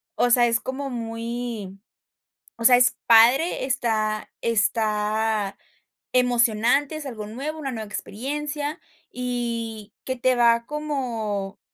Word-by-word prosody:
o 245 - +2
sea, 240 0 +5
es 230 -1 +2
como 275 +1 -4
muy 230 -4 -5 0.8
o 230 - -6
sea, 245 0 +8
es 250 0 +3
padre, 245 +8 +5
está 215 -4 -1
está 215 -2 0 0.6
emocionante, 245 +3 +2
es 305 - -7
algo 215 -5 -6
nuevo, 280 +8 -5
una 275 -3 -3
nueva 220 -2 -5
experiencia, 290 +8 -4 0.3
y 230 -4 -4
que 260 - -2
te 255 +1 +2
va 235 -1 +4
como 235 -10 -3
235 Hz, 120 wpm, -24 LUFS, 220-260 Hz, 0.8 s, sea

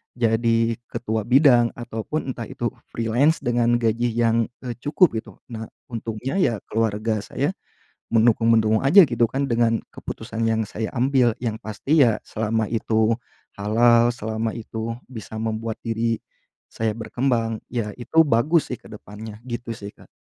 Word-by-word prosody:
jadi 115 0 +2 0.2
ketua 110 -2 -2
bidang, 125 -3 +5
ataupun 120 +4 -4
entah 120 - -6
itu 120 -1 -3 0.2
freelance 120 +8 +2
dengan 120 -1 +2
gaji 120 0 +1
yang, 115 -1 +2 0.2
eee, 120 -2 -4
cukup 150 +6 +3
gitu. - - -12 0.2
Nah, 110 -1 -6 0.2
untungnya 115 - -3
ya 130 -10 +3 0.2
keluarga 110 0 0
saya - - -2 0.6
mendukung-mendukung 115 -1 +3
aja 165 +7 +7
gitu 120 -3 -1
kan 140 +2 -1
dengan 115 -2 +2 0.2
keputusan 115 - -6
yang 110 -1 +1
saya 110 +2 -4
ambil. 130 -1 +3
Yang 115 -2 -4
pasti 135 +8 +2
ya 115 -4 +3
selama 110 0 -1
itu 110 0 +1 0.4
halal, 115 +3 +4
selama 110 -1 -3
itu 115 0 -5
bisa 110 -3 -8
membuat 110 0 -3
diri 115 0 -1 0.5
saya 115 0 -2
berkembang. 115 0 -1
Ya 110 -4 -3
itu 160 +6 +3
bagus 145 +6 +3
sih 125 - -3
ke - - -14
depannya, 105 0 -9
gitu 120 -1 -5
sih 105 -2 -7
Kak. - - -18
115 Hz, 145 wpm, -23 LUFS, 110-120 Hz, 0.6 s, aja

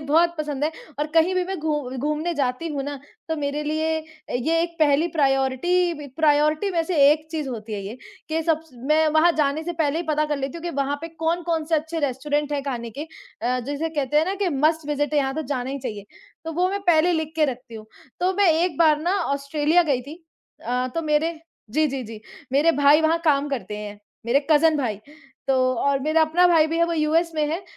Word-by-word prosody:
बहुत 335 +4 +3
पसंद 295 -2 -2
है 315 - -1 0.3
और 295 - 0
कहीं 330 +3 +4
भी 365 -1 +1
मैं 380 -1 -4
घू 295 -4 -2
घूमने 300 +5 -1
जाती 275 +2 -1
हूँ 285 -3 -3
ना, 285 0 -5 0.3
तो 320 - -1
मेरे 290 0 -2
लिए 315 +1 -1 0.5
ये 330 +6 +1
एक 340 0 -4
पहली 300 +1 +3
प्रायोरिटी 290 +4 +1
बी 295 -1 -8
प्रायोरिटी 305 +4 +2
वैसे 335 -1 -1
एक 310 +1 0
चीज़ 310 -4 -3
होती 225 -3 -6
है 205 - -3
ये 215 +5 -6 0.3
कि 320 +1 -1
सब 315 -1 +1
स 325 - -23 0.2
मैं 315 0 +4
वहाँ 315 +3 +4
जाने 300 0 +1
से 345 - -3
पहले 310 -3 0
ही - - -1
पता 305 0 +2
कर 295 - -1
लेती 275 +2 -4
हूँ 335 - -9
कि 345 - -3
वहाँ 280 +1 0
पे 330 - -6
कौन-कौन 330 0 -1
से 325 +1 0
अच्छे 320 +2 -1
रेस्टोरेंट 290 +2 -1
हैं 285 -1 -1
खाने 240 -4 -4
के। 280 - -6 0.4
अ, 250 +2 +1
जैसे 290 +4 -2
कहते 295 -3 -1
हैं 305 - +5
ना 380 +3 -2
कि 380 - +2
मस्ट 310 +1 +1
विज़िट 290 -1 -1
है 295 - +3
यहाँ 270 -1 0
तो 315 - -2
जाना 255 -1 -3
ही 280 - -4
चाहिए, 210 -6 -6 0.4
तो 325 - -4
वो 360 +3 +1
मैं 400 +1 -2
पहले 345 +1 +4
लिख 315 -2 -2
के 310 - +4
रखती 250 -4 -5
हूँ। 215 -1 -9 0.3
तो 365 +1 +2
मैं 405 -2 +4
एक 330 0 0
बार 310 -3 +5
ना 345 - -1 0.2
ऑस्ट्रेलिया 295 +4 +2
गई 280 -6 0
थी 285 +5 -9 0.5
अ, 250 +1 0
तो 330 - -1
मेरे 310 +2 +1 0.4
जी, 310 +6 +2
जी, 270 -2 -3
जी, 220 -2 -9 0.3
मेरे 300 +5 +4
भाई 290 +2 +6
वहाँ 320 +1 +2
काम 290 -2 +2
करते 245 -6 -4
हैं, 210 0 -7 0.3
मेरे 255 +4 +3
कज़िन 310 +1 +5
भाई, 240 -8 -1 0.5
तो 270 - +4 0.3
और 280 -1 +2
मेरा 310 +3 +2
अपना 335 +3 +4
भाई 330 -3 +5
भी 325 +1 -2
है 335 - +4
वो 340 - -2
यूएस 325 +2 +1
में 305 -1 +1
है 340 +4 -3
305 Hz, 230 wpm, -23 LUFS, 280-325 Hz, 0.5 s, भाई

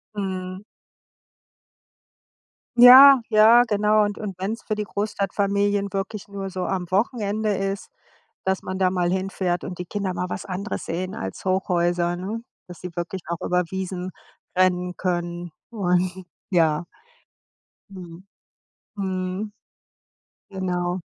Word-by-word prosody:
Mhm. 185 -1 -4 2.1
Ja, 260 +3 +10
ja, 225 +2 +7
genau. 210 0 +3
Und 205 0 -4
und 205 -3 -5
wenn's 210 +5 -4
für 215 - -2
die 210 - -2
Großstadtfamilien 200 0 -1
wirklich 200 +1 -4
nur 200 -1 -5
so 185 -1 -4
am 180 -2 -2
Wochenende 210 0 0
ist, 195 +1 -3 0.6
dass 190 0 0
man 190 0 -4
da 185 -1 +3
mal 180 -2 0
hinfährt 190 -2 -1
und 180 -1 -6
die 180 - -4
Kinder 195 0 -3
mal 180 0 -3
was - - -5
anderes 195 +3 -4
sehen 185 +3 -3
als 95 0 -6
Hochhäuser, 175 -2 +1
ne? 210 +6 -5 0.2
Dass 175 -2 -11
sie 180 - -6
wirklich 175 +2 -4
auch 170 0 -4
über 180 0 +2
Wiesen 185 -1 -4 0.5
rennen 180 -1 +2
können 175 -1 -3 0.2
und 185 -3 0 0.3
ja. 165 -2 +2 1.1
Mhm. 180 -2 -11 0.7
Mhm. 190 +1 -3 1.0
Genau. 180 -1 -2
190 Hz, 125 wpm, -23 LUFS, 180-205 Hz, 2.1 s, Ja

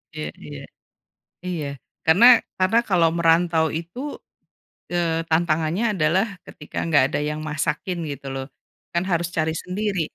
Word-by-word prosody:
Iya 75 - -4 0.2
iya, 75 -1 -8 0.9
iya 170 -5 -3 0.4
karena 180 +9 +6 0.3
karena 190 +5 +3
kalau 175 -4 +4
merantau 165 -1 +3
itu, 170 +7 -10 0.9
eee, 165 -2 0
tantangannya 160 +4 +1
adalah 175 +3 +2 0.2
ketika 150 - -12
enggak 150 -5 +4
ada 145 - -2
yang 150 0 -4
masakin 150 +4 -2
gitu 140 -1 -7
loh, 135 - -4 0.5
kan 170 +1 +1
harus 170 -1 +1
cari 160 0 +1
sendiri. 195 0 -2
165 Hz, 130 wpm, -23 LUFS, 155-180 Hz, 0.9 s, karena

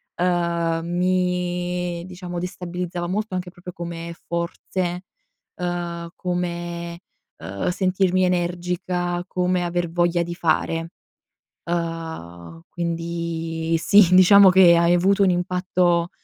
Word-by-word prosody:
ehm, 170 -2 0
mi 180 -1 -1
diciamo 180 -1 -7
destabilizzava 180 0 -4
molto 205 +2 -2
anche 180 0 -4
proprio 180 0 -10
come 170 0 -6
forze, 175 +1 -3 0.5
uhm, 175 -1 -4
come, 175 -1 -4 0.4
uhm, 100 - -4
sentirmi 185 0 +1
energica, 175 0 -1
come 180 0 0
aver 175 -1 -1
voglia 175 0 +1
di 170 0 -6
fare. 165 0 0 0.8
Uhm, 160 - -5
quindi 165 -1 -3
sì, 185 +1 +5
diciamo 190 +1 +8
che 180 -2 +7
ha, 170 0 +3
ehm, 175 - +5
avuto 195 +3 +3
un 185 - +4
impatto 180 -1 +1
175 Hz, 105 wpm, -22 LUFS, 170-180 Hz, 0.8 s, diciamo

